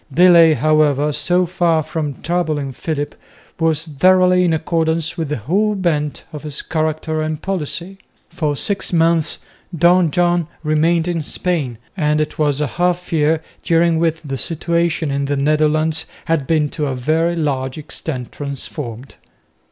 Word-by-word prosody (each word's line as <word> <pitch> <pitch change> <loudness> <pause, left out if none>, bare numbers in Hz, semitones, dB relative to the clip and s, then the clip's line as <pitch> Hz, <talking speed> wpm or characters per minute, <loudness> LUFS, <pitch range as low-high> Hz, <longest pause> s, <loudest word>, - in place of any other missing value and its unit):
Delay, 170 0 +6
however, 150 +1 +2
so 180 +5 +1
far 170 -2 +1
from 150 -3 -4
troubling 155 -5 -1
Philip, 145 +2 -4 0.5
was 160 -1 +1
thoroughly 180 +4 +4
in 175 - +2
accordance 160 0 0
with 165 -4 -3
the 150 - -1
whole 200 - 0
bent 155 -6 -1
of 150 - -6
his 150 -2 -5
character 155 0 -1
and 155 -1 -2
policy. 185 +1 -4 0.3
For 155 -4 -2
six 200 +6 -1
months 165 -2 +2 0.4
Don 175 +1 +4
John 175 +1 +1 0.2
remained 160 +2 +2
in 170 -2 -1
Spain, 150 -6 -2 0.2
and 150 -4 +1
it 155 0 -3
was 145 -2 +1
a 150 - +1 0.2
half 180 0 0
year 155 0 +2 0.2
during 165 -1 +2
which 165 -1 0
the 135 -3 -4
situation 170 -1 0
in 140 0 -1
the 140 0 -1
Netherlands 155 +2 +1 0.2
had 160 -5 0
been 155 -2 +2
to 150 0 -2
a 135 - -2
very 160 +7 +1
large 135 -4 -2
extent 145 -4 -5
transformed. 135 -3 -7
160 Hz, 150 wpm, -18 LUFS, 150-170 Hz, 0.5 s, Delay